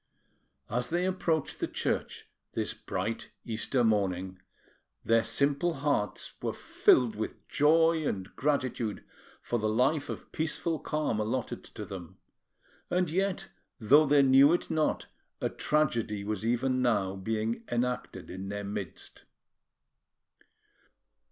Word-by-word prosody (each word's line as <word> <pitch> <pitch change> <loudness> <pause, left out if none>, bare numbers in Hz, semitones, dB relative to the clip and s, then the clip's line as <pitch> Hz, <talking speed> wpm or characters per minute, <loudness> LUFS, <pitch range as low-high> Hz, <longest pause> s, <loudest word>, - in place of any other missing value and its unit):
As 125 +2 -1
they 175 +2 +1
approached 170 -5 -1
the - - -1
church - - -2 0.3
this - - -1
bright 115 +1 -4 0.2
Easter 110 +3 0
morning, 95 -4 0 0.6
their 115 0 +4
simple 140 +9 +1
hearts 140 -8 -1
were - - -1
filled 120 -4 +3
with 110 +1 -5
joy 160 +1 +4
and 95 0 -4
gratitude 130 -7 -1 0.4
for 120 - -1
the 110 0 0
life 135 +6 +2
of - - -7
peaceful 160 0 -1
calm 150 -8 -1
allotted 115 +4 -2
to - - -8
them; 90 -4 -9 0.7
and 180 -3 +1
yet, 190 +2 -1 0.3
though 145 +7 +6
they 140 0 +5
knew 135 +3 +7
it 175 - -1
not, 155 -1 +1 0.3
a - - 0
tragedy 115 -9 0
was 105 0 -3
even 130 +3 +1
now 100 -6 +1
being 110 +3 -2
enacted 125 +1 -2
in 95 +2 -6
their 100 0 -4
midst. 100 -4 -7
125 Hz, 125 wpm, -30 LUFS, 105-150 Hz, 0.7 s, knew